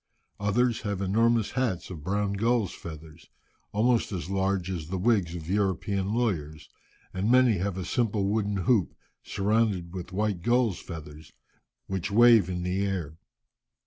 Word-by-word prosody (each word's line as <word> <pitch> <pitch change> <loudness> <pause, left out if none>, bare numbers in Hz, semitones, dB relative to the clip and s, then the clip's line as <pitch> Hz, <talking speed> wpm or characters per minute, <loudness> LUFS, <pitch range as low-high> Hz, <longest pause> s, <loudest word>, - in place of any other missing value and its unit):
Others 115 +4 +1
have 100 -3 -3
enormous 110 +3 +2
hats 115 -9 -2
of 80 -5 -8
brown 100 +3 -1
gulls' 115 -1 +1
feathers, 80 0 -11 0.4
almost 115 +3 +2
as 90 -1 -4
large 95 -2 0
as 85 -4 -4
the 95 +3 -3
wigs 95 -4 +1
of 80 -2 -7
European 95 0 0
lawyers, 80 -11 -2 0.4
and 95 +4 -1
many 125 -5 +5
have 95 0 -2
a 95 - -4
simple 110 -5 0
wooden 100 0 0
hoop, 110 -7 +2 0.3
surrounded 100 -4 0
with 90 0 -6
white 100 -2 -1
gulls' 120 -2 +2
feathers, 75 -3 -10 0.5
which 95 -1 -3
wave 115 -3 +6
in 90 -1 -3
the 90 +2 -1
air. 85 -6 -3
100 Hz, 145 wpm, -27 LUFS, 90-110 Hz, 0.5 s, wave